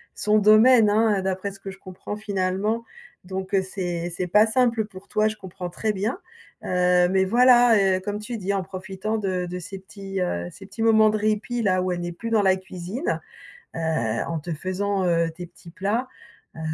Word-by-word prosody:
son 210 0 +2
domaine, 215 +2 +6
hein, 215 -1 +3
heu, - - -2
d'après 190 +1 -2
ce 195 - -14
que 195 - -8
je 190 - -12
comprends, 185 +2 -8
finalement, 205 +2 -1 0.4
donc, 190 +1 -6
heu, 195 - +4
c'est 175 -2 -4
c'est 180 +2 -3
pas 210 +5 +5
simple 230 -2 +2
pour 195 -2 -13
toi, 215 0 +2
je 215 - -3
comprends 185 -2 -7
très 215 +4 -2
bien, 210 - -2 0.5
heu, 180 0 +3
mais 190 0 +3
voilà, 245 +2 +6
heu, 190 -2 +3
comme 205 +2 -4
tu 230 +2 -5
dis 195 -1 -2
en 195 - 0
profitant 190 +3 -4
de 185 -3 -1
de 180 +1 -5
ces 195 +3 -8
petits, 195 0 -7
heu, 85 - -2
ces 195 - -12
petits 195 +3 -8
moments 220 -1 +5
de 215 - 0
répit, 215 +3 -1
là, 185 -3 +2
où 185 - -1
elle 175 -1 -2
n'est 175 0 -4
plus 230 +7 -6
dans 220 -2 +4
la 190 -1 +4
cuisine, 190 - -4 0.5
heu, - - -4 0.5
en 165 -1 -2
te 170 +3 -7
faisant, 190 +4 -2
heu, 170 -1 +2
tes 175 +2 -8
petits 170 - -16
plats, 205 +8 -2 0.5
heu, - - -10
195 Hz, 210 wpm, -24 LUFS, 185-215 Hz, 0.5 s, domaine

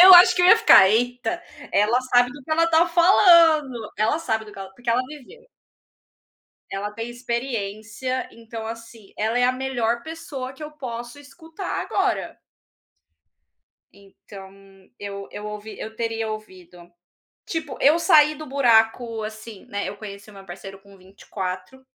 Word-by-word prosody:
Eu 375 - +11
acho 360 0 +8
que 360 - +2
eu - - +6
ia 370 - +8
ficar: 190 - +7
"Eita, 245 - -1 0.3
ela 215 +4 +3
sabe 245 -1 +3
do 285 +1 -12
que - - -12
ela 330 +1 +3
está 335 +1 +3
falando, 335 - +4
ela 220 +8 +1
sabe 220 -9 -2
do 210 - -13
que - - -13
ela 195 -1 -8
porque 245 -1 -4
ela 235 +2 +2
viveu" 305 - -13 1.3
"ela 200 +1 -4
tem 225 +2 -6
experiência. 235 0 -4
Então, 225 -1 -9
assim, 225 -2 -10
ela 220 +3 0
é 245 - +3
a 250 - +3
melhor 245 -3 -2
pessoa 315 -5 -7
que 285 +3 -13
eu 300 - -7
posso 240 -2 -7
escutar 320 +6 -7
agora". - - -2 1.5
Então, 195 0 -14 0.5
eu 200 -1 -7
eu 210 - -8
ouvi 210 +1 -8
eu 220 0 -8
teria 225 -1 -3
ouvido, 180 -5 -11 0.6
tipo, 315 -4 -5
eu 295 +4 +5
saí 305 -4 +5
do 310 +1 -9
buraco, 230 -3 +2
assim, 215 -1 -9
né, 200 0 -4
eu 205 - -9
conheci 200 0 -10
o - - -15
meu 195 -1 -13
parceiro 195 +2 -10
com 200 0 -18
24, 185 +4 -8
235 Hz, 160 wpm, -23 LUFS, 210-285 Hz, 1.5 s, Eu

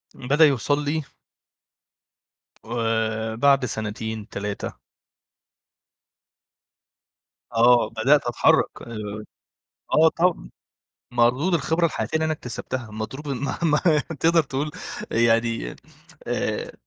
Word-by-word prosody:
بدأ 145 +5 +4
يوصل 145 +1 +1
لي 155 +1 -1 1.6
آآ، 110 -1 -1
بعد 135 +2 +4
سنتين 110 -1 -4
3. 100 0 -4 2.8
آه، 120 -1 +5
بدأت 120 +5 +3
أتحرّك 120 - +2
آآ 105 -2 -6 0.7
آه 160 +1 +6
طب 165 - 0 0.6
مردود 125 +9 +2
الخبرة 165 +2 +1
الحياتية 160 - -4
اللي 160 0 +2
أنا 160 - 0
اكتسبتها 125 -4 -5
مضروب، 110 +8 -6
ما 140 0 -3
ما 150 -3 +3 0.4
تقدر 165 0 +4
تقول 140 +2 -3 0.4
يعني 115 - +1 0.5
آآ، - - -2
120 Hz, 95 wpm, -24 LUFS, 110-150 Hz, 2.8 s, آه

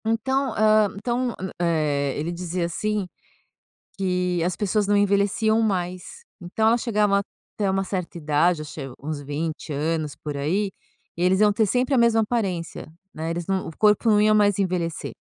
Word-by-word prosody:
Então, 265 +5 0
hã 215 -1 +4
então, 240 +3 -1
m 190 0 -4
eh, 150 -5 0
ele 160 +3 -2
dizia, 175 0 -3
assim, 210 +3 -2 0.9
que 180 -2 0
as 175 0 -1
pessoas 205 0 0
não 205 0 +3
envelheciam 205 +2 +2
mais. 185 - -3 0.2
Então, 195 +5 0
elas 235 +1 +3
chegavam 210 -4 +2
até 200 0 -4
uma 195 0 +1
certa 180 -3 -4
idade, 155 +2 +1
acho 155 +1 -9
é 135 -2 -6
uns 150 -1 -4
20 150 +3 -4
anos, 150 0 -2
por 150 -2 -6
aí, 185 +9 -1 0.4
e 170 - -6
eles 185 +1 +3
iam 210 -1 +5
ter 220 0 +2
sempre 250 +6 +1
a - - +4
mesma 235 -1 +4
aparência, 190 -9 -3 0.2
né, 160 +1 -4
eles 170 0 -3
não 190 +1 -1
o - - -6
corpo 210 +2 +3
não 210 -1 +5
ia 215 0 +4
mais 205 -2 +3
envelhecer. 180 -4 -2
190 Hz, 175 wpm, -24 LUFS, 165-215 Hz, 0.9 s, iam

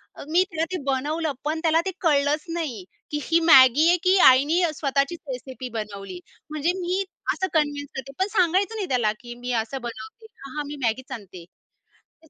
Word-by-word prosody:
अ, - - -9
मी 360 +3 +5
त्याला 325 -2 -1
ते - - 0
बनवलं. 295 +4 -1
पण, 310 +2 -1
त्याला 325 0 +3
ते 380 - -1
कळलंच 295 -2 +2
नाही 280 - -4 0.3
की 295 - -1
ही 330 +1 +2
Maggi 265 +3 +7
आहे 350 - +4
की 370 +1 +4
आईने 285 +7 +5
स्वतःचीच 280 +3 -1
रेसिपी 255 0 -7
बनवली. 200 -3 -6 0.3
म्हणजे 305 +3 0
मी 365 +3 -1 0.3
असं 375 - -2
कन्व्हेन्स 290 -2 0
करते, 270 +1 -6
पण 380 - +2
सांगायचं 375 +4 +2
नाही, 405 -4 -3
त्याला 240 -5 +2
की 240 -1 -9
मी 250 +1 -4
असं 265 +3 -7
बनवते. 220 - -10
हा, 275 -4 -11
हा, 300 - -1
मी 295 - -6
Maggiच 260 +4 -2
आणते 185 -5 -11 0.6
तर, 320 - -27
290 Hz, 185 wpm, -24 LUFS, 255-330 Hz, 0.6 s, Maggi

